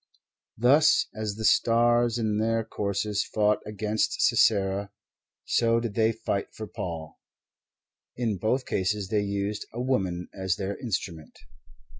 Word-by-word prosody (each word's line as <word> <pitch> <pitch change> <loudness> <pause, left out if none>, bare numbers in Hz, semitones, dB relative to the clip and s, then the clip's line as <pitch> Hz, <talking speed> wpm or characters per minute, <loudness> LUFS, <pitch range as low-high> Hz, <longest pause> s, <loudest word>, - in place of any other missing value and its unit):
Thus, 140 +7 +5
as 110 -2 -4
the 110 +1 -4
stars 120 +1 +3
in 110 -2 0
their 115 +1 +1
courses 100 -1 -2
fought 105 0 +1
against 105 +1 -1
Sisera, 100 -1 +2 0.6
so 115 0 +2
did 115 -3 -4
they 110 0 +3
fight 110 -3 -3
for 110 - -6
Paul; 80 -6 -7 1.0
and 120 -2 0
in 100 - -3
both 125 +7 0
cases 95 +1 -1
they 105 -1 +1
used 100 +1 -3
a 120 - -7
woman 95 -9 -1
as 95 -2 -1
their 100 +1 -3
instrument. 90 - -5
105 Hz, 135 wpm, -27 LUFS, 100-115 Hz, 1.0 s, Thus